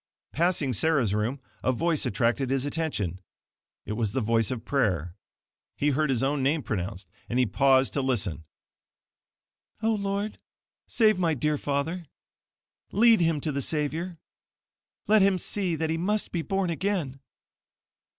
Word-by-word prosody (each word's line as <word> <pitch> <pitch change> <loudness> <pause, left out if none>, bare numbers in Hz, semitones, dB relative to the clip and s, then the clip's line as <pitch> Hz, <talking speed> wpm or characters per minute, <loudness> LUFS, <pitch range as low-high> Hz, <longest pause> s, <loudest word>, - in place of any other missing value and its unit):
Passing 165 -5 +1
Sarah's 135 -5 +2
room, 110 +6 -1 0.2
a 130 - +3
voice 160 +4 0
attracted 120 +5 0
his 135 0 0
attention. 145 - -2 0.7
It - - -5
was 110 -2 -1
the - - +1
voice 115 -1 +2
of 120 -3 -4
prayer. 90 - 0 0.6
He 145 - +2
heard 155 +1 +1
his 130 -1 +1
own 140 +1 +1
name 145 +3 +1
pronounced, 95 -2 -4 0.2
and 120 - -1
he 130 - +4
paused 130 +5 +3
to 140 - 0
listen. 100 - -1 1.4
"Oh, 225 0 +3
Lord, 200 0 -2 0.5
save 215 -4 +3
my 165 -3 +2
dear 150 +3 0
father. 150 +5 -2 0.8
Lead 225 +2 +5
him 165 -2 +2
to 155 - -1
the 140 0 -2
Savior. 160 +5 -1 0.9
Let 215 0 +5
him 195 -1 +4
see 185 -1 -1
that 160 0 -1
he 165 - 0
MUST 210 +4 0
BE 170 - -1
BORN 195 0 -1
AGAIN. 165 -7 -2
145 Hz, 150 wpm, -27 LUFS, 125-170 Hz, 1.4 s, Lead